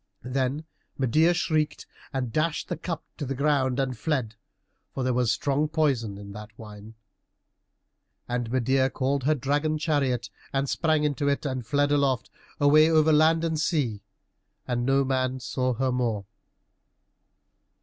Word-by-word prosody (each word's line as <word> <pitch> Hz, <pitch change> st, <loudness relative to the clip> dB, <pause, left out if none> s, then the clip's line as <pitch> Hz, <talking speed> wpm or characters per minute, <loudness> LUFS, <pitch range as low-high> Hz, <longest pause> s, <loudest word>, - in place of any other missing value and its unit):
Then 135 Hz, +4 st, -1 dB, 0.3 s
Medeia 155 Hz, +6 st, +3 dB
shrieked 155 Hz, -3 st, 0 dB, 0.3 s
and 125 Hz, -4 st, -3 dB
dashed 155 Hz, 0 st, -1 dB
the -, -, -1 dB
cup 165 Hz, 0 st, -5 dB
to 145 Hz, -, -4 dB
the 135 Hz, -, -2 dB
ground 140 Hz, -2 st, +1 dB
and 130 Hz, -2 st, -1 dB
fled, 125 Hz, -3 st, -2 dB, 0.6 s
for 135 Hz, -, -2 dB
there 130 Hz, 0 st, +1 dB
was 120 Hz, -2 st, +2 dB
strong 140 Hz, +6 st, 0 dB
poison 135 Hz, -10 st, 0 dB
in 100 Hz, 0 st, -9 dB
that 105 Hz, +1 st, -10 dB
wine. 105 Hz, 0 st, -11 dB, 1.3 s
And 120 Hz, -1 st, -2 dB
Medeia 130 Hz, +2 st, +2 dB
called 135 Hz, 0 st, -1 dB
her 155 Hz, +1 st, +3 dB
dragon 145 Hz, +3 st, 0 dB
chariot, 140 Hz, -7 st, 0 dB, 0.2 s
and 135 Hz, 0 st, 0 dB
sprang 155 Hz, +1 st, +1 dB
into 145 Hz, -1 st, 0 dB
it, 140 Hz, +1 st, 0 dB
and 130 Hz, -4 st, -3 dB
fled 145 Hz, +3 st, +2 dB
aloft, 140 Hz, -5 st, +1 dB, 0.3 s
away 155 Hz, +2 st, +6 dB
over 160 Hz, -1 st, +4 dB
land 160 Hz, +2 st, +4 dB
and 160 Hz, -2 st, -1 dB
sea, 135 Hz, -, 0 dB, 0.7 s
and 120 Hz, 0 st, -1 dB
no 135 Hz, 0 st, +3 dB
man 130 Hz, -1 st, 0 dB
saw 125 Hz, 0 st, -1 dB
her 130 Hz, +2 st, 0 dB
more. 115 Hz, -5 st, -1 dB
135 Hz, 150 wpm, -26 LUFS, 125-150 Hz, 1.3 s, away